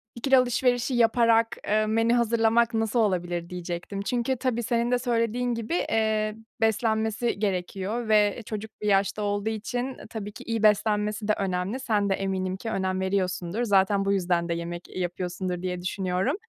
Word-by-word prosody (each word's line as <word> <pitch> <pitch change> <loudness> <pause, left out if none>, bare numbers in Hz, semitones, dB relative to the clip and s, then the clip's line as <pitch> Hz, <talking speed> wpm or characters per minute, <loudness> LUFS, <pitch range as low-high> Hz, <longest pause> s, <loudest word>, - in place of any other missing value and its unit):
İkili 265 +3 +3
alışverişi 250 0 +2
yaparak, 230 0 +3
eee, 215 +1 +2
menü 225 +2 +2
hazırlamak 235 0 +3
nasıl 225 +1 0
olabilir 175 -5 0
diyecektim. 180 +2 -5
Çünkü 240 +5 0
tabii 240 -1 -1
senin 235 +1 0
de 250 - +3
söylediğin 240 0 0
gibi, 230 +5 -4 0.2
eee, 215 -1 +1 0.3
beslenmesi 220 0 +1
gerekiyor 200 +3 -2
ve 210 +1 +3
çocuk 215 0 -5
bir 210 - -2
yaşta 200 +1 +2
olduğu 205 +1 -1
için, 245 +3 -3
e, - - -11
tabii 210 -3 -6
ki 225 +1 -4
beslenmesi 210 0 +2
de 215 - +4
önemli. 190 +4 -2
Sen 210 -6 0
de - - +3
eminim 190 -1 -2
ki 225 - -5
önem 190 -3 -1
veriyorsundur. 190 +2 -1
Zaten 195 -2 +3
bu 200 - +2
yüzden 175 -3 0
de - - +1
yemek, 170 +1 -5
eee, - - -7
yapıyorsundur 180 0 -3
diye 180 -1 -3
düşünüyorum. 185 - -1
215 Hz, 165 wpm, -26 LUFS, 190-230 Hz, 0.3 s, de